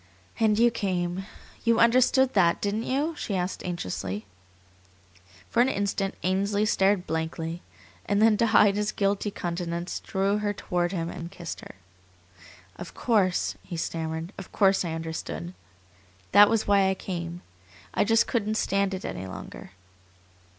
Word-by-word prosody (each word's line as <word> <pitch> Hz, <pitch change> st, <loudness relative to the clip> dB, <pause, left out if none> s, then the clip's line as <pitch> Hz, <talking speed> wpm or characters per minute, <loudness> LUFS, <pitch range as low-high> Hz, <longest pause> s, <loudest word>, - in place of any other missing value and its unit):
"And 215 Hz, -2 st, +3 dB
you 235 Hz, +1 st, +5 dB
came. 185 Hz, -3 st, -2 dB, 0.4 s
You 230 Hz, -1 st, +3 dB
understood 255 Hz, +2 st, +4 dB
that, 175 Hz, -4 st, +3 dB
didn't 210 Hz, +3 st, -1 dB
you?" 290 Hz, +5 st, 0 dB
she 205 Hz, -, -3 dB
asked 180 Hz, 0 st, -2 dB
anxiously. 100 Hz, -, -4 dB, 1.2 s
For 235 Hz, -, +2 dB
an 255 Hz, -, +4 dB
instant 200 Hz, -3 st, -1 dB
Ainsley 200 Hz, +3 st, +1 dB
stared 195 Hz, -2 st, +2 dB
blankly, 160 Hz, +1 st, -3 dB, 0.5 s
and 205 Hz, 0 st, +2 dB
then 220 Hz, 0 st, +5 dB
to 230 Hz, -, +3 dB
hide 205 Hz, -2 st, +5 dB
his 210 Hz, 0 st, 0 dB
guilty 200 Hz, +1 st, 0 dB
countenance 175 Hz, -2 st, -4 dB
drew 195 Hz, +2 st, 0 dB
her 205 Hz, -1 st, -1 dB
toward 175 Hz, -3 st, -1 dB
him 170 Hz, -3 st, -3 dB
and 170 Hz, -1 st, -7 dB
kissed 175 Hz, -3 st, -7 dB
her. -, -, -12 dB, 1.0 s
"Of -, -, -9 dB
course," 200 Hz, -7 st, +1 dB
he 170 Hz, -, -7 dB
stammered 160 Hz, +2 st, -3 dB
"of 195 Hz, -, -9 dB
course 195 Hz, -1 st, +3 dB
I 165 Hz, -2 st, -3 dB
understood. 165 Hz, +2 st, -5 dB, 0.8 s
That 205 Hz, +1 st, +8 dB
was 225 Hz, -1 st, +1 dB
why 200 Hz, -1 st, +4 dB
I 190 Hz, -, 0 dB
came. 175 Hz, -2 st, -5 dB, 0.5 s
I -, -, +3 dB
just 225 Hz, +2 st, +3 dB
couldn't 215 Hz, -2 st, -1 dB
stand 195 Hz, -2 st, +1 dB
it 185 Hz, -, -7 dB
any 95 Hz, +1 st, -5 dB
longer." 95 Hz, 0 st, -9 dB
195 Hz, 150 wpm, -27 LUFS, 175-210 Hz, 1.2 s, That